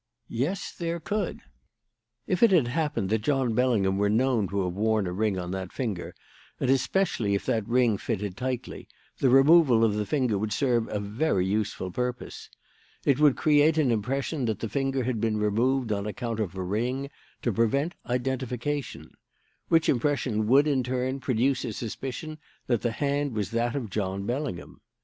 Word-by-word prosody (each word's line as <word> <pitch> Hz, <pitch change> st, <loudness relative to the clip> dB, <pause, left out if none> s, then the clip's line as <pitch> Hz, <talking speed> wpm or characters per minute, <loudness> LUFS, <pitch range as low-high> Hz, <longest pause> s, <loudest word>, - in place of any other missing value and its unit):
Yes, 145 Hz, +12 st, -2 dB
there 170 Hz, 0 st, -3 dB
could. 200 Hz, +3 st, -3 dB, 0.8 s
"If 185 Hz, -1 st, -1 dB
it 235 Hz, -, +7 dB
had 170 Hz, -10 st, +4 dB
happened 140 Hz, -, -1 dB
that 110 Hz, -1 st, +2 dB
John 130 Hz, -1 st, +1 dB
Bellingham 110 Hz, -6 st, +2 dB
were 100 Hz, 0 st, +2 dB
known 115 Hz, -1 st, +2 dB
to 100 Hz, 0 st, -1 dB
have 90 Hz, -1 st, -2 dB
worn 110 Hz, +1 st, +1 dB
a 90 Hz, -, -3 dB
ring 100 Hz, +1 st, 0 dB
on 90 Hz, -1 st, -4 dB
that 95 Hz, -1 st, -4 dB
finger, 110 Hz, -9 st, -4 dB, 0.4 s
and 130 Hz, -, +2 dB
especially 135 Hz, -, +1 dB
if 100 Hz, -, -3 dB
that 110 Hz, -3 st, 0 dB
ring 120 Hz, -4 st, +3 dB
fitted 105 Hz, -4 st, -3 dB
tightly, 130 Hz, +1 st, -4 dB, 0.3 s
the 135 Hz, -, +3 dB
removal 135 Hz, -2 st, +6 dB
of 110 Hz, -, +2 dB
the 105 Hz, -1 st, -2 dB
finger 125 Hz, -9 st, +1 dB
would 105 Hz, 0 st, -2 dB
serve 120 Hz, -1 st, +1 dB
a 105 Hz, -, -3 dB
very 100 Hz, -1 st, 0 dB
useful 100 Hz, -2 st, -2 dB
purpose. 125 Hz, +4 st, -4 dB, 0.6 s
It 140 Hz, -1 st, +3 dB
would 150 Hz, -3 st, +5 dB
create 155 Hz, +1 st, +4 dB
an 145 Hz, -6 st, +3 dB
impression 130 Hz, +5 st, -1 dB
that 110 Hz, -3 st, -1 dB
the 115 Hz, -, -4 dB
finger 135 Hz, 0 st, -1 dB
had 120 Hz, -3 st, -2 dB
been 110 Hz, -1 st, +1 dB
removed 115 Hz, +4 st, +1 dB
on 100 Hz, 0 st, -1 dB
account 115 Hz, +1 st, -4 dB
of 95 Hz, -4 st, -2 dB
a 95 Hz, -, -3 dB
ring, 125 Hz, +9 st, -2 dB, 0.3 s
to 120 Hz, -, +1 dB
prevent 140 Hz, -, +1 dB
identification; 130 Hz, +2 st, -3 dB, 0.6 s
which 165 Hz, -1 st, +3 dB
impression 120 Hz, -5 st, +1 dB
would, 135 Hz, +5 st, +5 dB
in 140 Hz, -4 st, +2 dB
turn, 130 Hz, +2 st, -2 dB
produce 130 Hz, +1 st, +1 dB
a 115 Hz, -4 st, -3 dB
suspicion 135 Hz, +8 st, -6 dB, 0.3 s
that 120 Hz, -4 st, +1 dB
the 120 Hz, -2 st, -1 dB
hand 140 Hz, +1 st, -1 dB
was 105 Hz, -2 st, -2 dB
that 115 Hz, +2 st, 0 dB
of 120 Hz, -8 st, -4 dB
John 100 Hz, -1 st, -2 dB
Bellingham. 125 Hz, -, -4 dB
120 Hz, 175 wpm, -27 LUFS, 105-135 Hz, 0.8 s, it